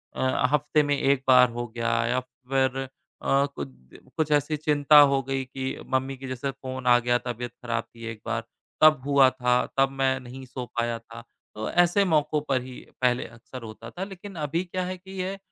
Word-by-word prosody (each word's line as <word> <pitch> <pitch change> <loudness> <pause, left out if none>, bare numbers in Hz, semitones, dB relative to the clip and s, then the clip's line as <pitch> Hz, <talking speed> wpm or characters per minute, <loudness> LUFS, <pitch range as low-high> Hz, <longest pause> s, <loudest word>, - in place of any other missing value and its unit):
अ, - - -3 0.3
हफ्ते 150 +1 +2
में 145 0 +1
1 135 -1 +2
बार 125 -1 +7
हो 120 +1 -4
गया 115 +1 -3 0.2
या 125 +1 +1
फ़िर 130 +1 -2 0.4
अ, 140 +1 +3
कुछ - - -5 0.5
कुछ 155 -1 0
ऐसी 150 +1 +2
चिंता 150 0 +4
हो 135 0 +2
गई 135 0 -2
कि 130 +1 -6 0.2
मम्मी 130 +1 -1
की 135 0 -8
जैसे 130 +2 -3
फ़ोन 130 -1 -7
आ 120 0 +7
गया, 120 0 +2
तबीयत 120 0 -5
खराब 115 -2 -2
थी 115 -1 -12
एक 110 - -11
बार। - - -2 0.4
तब 155 -3 +7
हुआ 140 -2 +6
था, 125 -1 +1
तब 135 0 +4
मैं 135 -1 +1
नहीं 130 +1 -10
सो 125 0 -6
पाया 120 0 0
था। 115 0 -11 0.3
तो 110 +1 -3
ऐसे 175 +3 +4
मौकों 150 -3 +2
पर 130 -2 +2
ही 125 0 -9 0.2
पहले 125 0 +2
अक्सर 120 +2 -11
होता 115 +1 -9
था। 180 +10 -6
लेकिन 195 0 -9
अभी 165 +5 -1
क्या 185 0 -3
है 185 0 -4
कि 190 +1 -14
ये 190 +2 -3
130 Hz, 200 wpm, -26 LUFS, 125-150 Hz, 0.5 s, बार